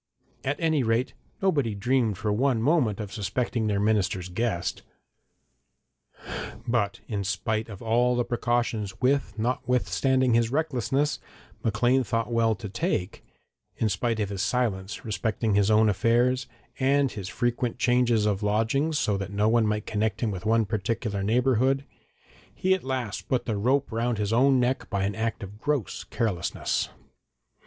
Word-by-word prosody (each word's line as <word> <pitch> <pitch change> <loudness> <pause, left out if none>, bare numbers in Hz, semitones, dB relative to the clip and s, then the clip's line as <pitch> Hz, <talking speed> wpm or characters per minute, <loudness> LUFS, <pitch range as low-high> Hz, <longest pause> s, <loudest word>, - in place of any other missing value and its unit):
At 140 +2 -1
any 160 -3 +2
rate, 115 +2 0 0.3
nobody 140 - +1
dreamed 115 -1 +1
for 105 +1 -1
one 125 +2 +2
moment 120 -5 +2
of 105 -2 -6
suspecting 110 +3 -1
their 100 -1 +1
minister's 100 -3 +1
guest. 95 -2 -2 1.9
But 115 -4 0
in 105 -3 -2
spite 110 +3 -2
of 100 -1 -9
all 120 +2 +2
the 120 0 +1
precautions 120 -4 -1
which, 135 +2 +3 0.2
notwithstanding 125 +2 +1
his 115 0 +3
recklessness, 145 0 0 0.4
Maclean 120 +4 +2
thought 115 0 -2
well 115 -1 +2
to 105 - -7
take 105 - -2 0.5
in 110 - +1
spite 110 +4 -1
of 105 -2 -1
his 100 -2 -3
silence 100 -3 -1
respecting 110 0 -1
his 100 0 +3
own 110 0 +5
affairs, 120 +5 +2 0.3
and 140 0 +3
his 95 -3 -6
frequent 120 +1 -1
changes 120 -3 +3
of 105 -1 0
lodgings 115 +9 +1
so 105 -7 +1
that 100 0 -4
no 105 +1 +1
one 115 -1 +3
might 105 0 -1
connect 110 -1 -1
him 115 -3 +1
with 95 +1 -5
one 115 0 +3
particular 105 0 -2
neighbourhood, 130 +5 +2 0.7
he 190 +1 +2
at 190 - -1
last 130 -5 -3
put 125 -2 +1
the 110 - -1
rope 130 +7 +1
round 115 +1 0
his 105 +1 -1
own 130 +2 +4
neck 125 +2 0
by 100 -1 -1
an 100 +1 0
act 115 0 -2
of 100 +2 -10
gross 145 - -1
carelessness. 105 -7 -1
115 Hz, 155 wpm, -26 LUFS, 105-125 Hz, 1.9 s, own